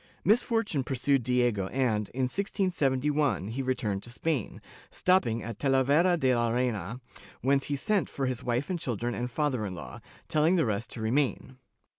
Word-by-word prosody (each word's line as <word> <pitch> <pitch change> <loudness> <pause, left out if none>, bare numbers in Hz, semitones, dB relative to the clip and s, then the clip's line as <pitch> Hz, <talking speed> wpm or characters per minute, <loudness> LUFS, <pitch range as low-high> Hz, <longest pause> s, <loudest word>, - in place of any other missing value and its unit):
Misfortune 215 - +2
pursued 135 +1 +1
Diego 120 -5 +1
and, 110 -4 0
in 130 +1 -2
1671, 150 - 0
he 125 +5 -3
returned 115 -7 -1
to 120 - -8
Spain, 135 -1 -2 0.3
stopping 120 - +1
at 115 +1 -6
Talavera 145 +6 +3
de 130 -3 +3
la 120 0 +1
Reina, 120 -2 -1 0.4
whence 135 +1 +2
he 145 - -1
sent 205 +6 0
for 135 - -3
his 130 -2 -3
wife 125 +6 -1
and 175 - -2
children 120 -3 -2
and 120 +1 -3
father 130 -3 -1
in 95 -3 -4
law, 60 -8 -8 0.3
telling 155 +4 +3
the 165 - +2
rest 110 0 -2
to 115 - -6
remain. 130 +2 -1
130 Hz, 165 wpm, -28 LUFS, 115-150 Hz, 0.4 s, Talavera